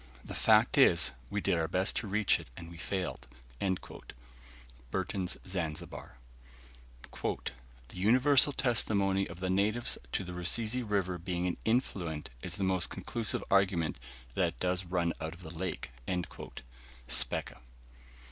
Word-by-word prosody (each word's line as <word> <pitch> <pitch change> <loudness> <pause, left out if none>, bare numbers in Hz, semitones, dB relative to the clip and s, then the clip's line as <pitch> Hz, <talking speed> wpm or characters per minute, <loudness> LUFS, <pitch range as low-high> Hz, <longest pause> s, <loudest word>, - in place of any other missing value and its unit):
The - - -7
fact - - +4
is, - - +6 0.2
we - - -1
did 85 - +2
our 80 - 0
best 90 +4 +1
to 110 - -2
reach 105 +1 +3
it, - - -11
and 85 0 -9
we 85 - -10
failed." 85 -9 -3 1.6
Burton's 95 +2 -1
Zanzibar. 80 -8 -5 1.0
"The - - -2 0.6
universal 130 +9 +5
testimony 100 -7 +2
of 85 +1 -10
the 95 -1 0
natives 105 +5 +2
to - - +1
the 90 -1 -7
Rusizi 110 +7 +3
River 100 -5 -1
being 90 0 -2
an 90 - -1
influent 95 - -1
is - - -4
the 100 - -2
most 95 -2 +2
conclusive 115 -3 -1
argument 95 -7 +2 0.3
that 90 +3 +2
it - - -23
does 90 0 0
run 85 -1 0
out 80 +1 -4
of 90 - -14
the 80 -1 -8
lake." 90 +2 -4 1.2
Speke. - - +1
95 Hz, 140 wpm, -32 LUFS, 85-100 Hz, 1.6 s, is